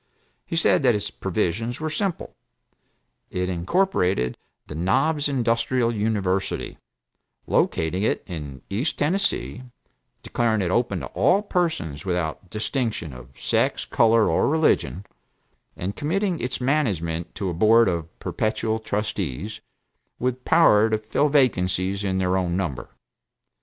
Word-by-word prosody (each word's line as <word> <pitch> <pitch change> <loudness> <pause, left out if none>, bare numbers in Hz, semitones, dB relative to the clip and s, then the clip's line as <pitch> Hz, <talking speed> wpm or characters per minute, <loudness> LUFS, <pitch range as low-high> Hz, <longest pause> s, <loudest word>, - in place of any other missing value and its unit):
He - - -3
said 165 +1 +3
that 125 -4 +4
its 105 - -3
provisions 105 +5 -2
were 155 0 -2
simple. 180 +2 -3 0.9
It 90 0 -2
incorporated 90 - +1 0.3
the - - -8
Knobs 140 - +1
Industrial 120 -1 +1
University, 100 -3 -1 0.7
locating 80 +4 +1
it 110 - 0
in 75 -6 -7
East 115 +10 -2
Tennessee, 180 -5 0 0.6
declaring 110 -4 +1
it 90 - -1
open 100 -5 0
to - - -4
all 200 +3 +3
persons 160 - -1
without 90 0 -2
distinction 110 - -2
of 60 +1 -13
sex, - - 0
color 115 -1 +4
or - - +2
religion, 150 - +1 0.7
and 95 +3 -4
committing 175 +3 -1
its 125 - -3
management 90 - -1
to 95 -3 -2
a - - -4
board 110 +6 +5
of 85 -3 -1
perpetual 110 0 -1
trustees, 105 - -3 0.6
with 125 0 -2
power 110 -10 +5
to 110 - +2
fill 110 +7 0
vacancies 95 -8 +1
in 95 -1 0
their 95 0 +1
own 90 -1 0
number. 85 -10 -3
105 Hz, 125 wpm, -24 LUFS, 90-130 Hz, 0.9 s, board